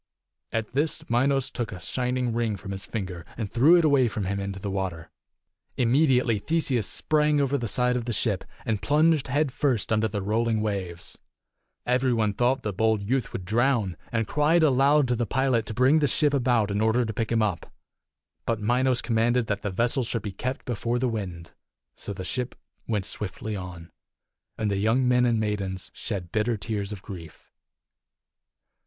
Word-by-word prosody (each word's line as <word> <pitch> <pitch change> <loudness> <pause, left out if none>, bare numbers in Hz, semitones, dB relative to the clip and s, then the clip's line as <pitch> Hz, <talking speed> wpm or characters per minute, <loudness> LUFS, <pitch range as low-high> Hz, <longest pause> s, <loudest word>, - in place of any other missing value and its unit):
At 115 0 -3
this 155 +3 0
Minos 135 +2 +2
took 120 -3 -3
a 95 - -7
shining 125 +4 -1
ring 115 -3 -1
from 95 0 -8
his 95 0 -6
finger 95 -6 -5
and 110 -4 -4
threw 140 +9 +6
it 170 -2 +4
away 140 -4 +4
from 110 -3 -3
him 100 +1 -2
into 100 0 -4
the 100 0 -4
water. 95 -4 -4 0.7
Immediately 125 -3 +3
Theseus 135 -5 0
sprang 150 -1 +2
over 140 0 +1
the 120 -4 -1
side 125 +3 +2
of 120 -2 -2
the 120 - -2
ship, 105 -4 0 0.2
and 110 -3 -1
plunged 150 0 +3
head 145 +2 +1
first 125 -5 0
under 110 +1 +2
the 105 -2 -4
rolling 110 +2 +1
waves. 95 -5 -3 0.7
Every 125 +1 +2
one 110 -3 +1
thought 125 +4 +1
the 105 - -2
bold 110 +1 +2
youth 125 +5 0
274 - - -15
would 90 - -5
drown, 115 -3 +1
and 110 -2 0
cried 155 +3 +3
aloud 140 0 +4
to 125 - +1
the 120 -1 -1
pilot 130 -3 +1
to - - -4
bring 130 +6 +4
the 145 - +2
ship 145 +3 +2
about 120 -6 +2
in 100 +1 0
order 110 +2 +2
to 110 - -4
pick 115 +1 -2
him 115 -1 +3
up. 95 -6 -2 0.8
But 115 -2 0
Minos 125 +3 +1
commanded 120 +1 +2
that 100 -2 -2
the 105 - -2
vessel 115 +7 +1
should 115 -2 -2
be 105 - -4
kept 125 +7 -4
before 120 0 -1
the 125 0 0
wind. 90 -7 -5 0.4
So - - -7
the 95 -2 -6
ship 125 +5 -3 0.3
went 105 -4 -1
swiftly 105 +2 -4
on, 90 -3 -8 0.7
and 110 -2 -1
the 100 - 0
young 115 +6 +2
men 125 0 +4
and 115 -2 +2
maidens 100 -3 -2
shed 95 -7 -5
bitter 110 +3 0
tears 100 0 -3
of 100 -2 -7
grief. 85 -5 -10
115 Hz, 190 wpm, -26 LUFS, 100-130 Hz, 0.8 s, threw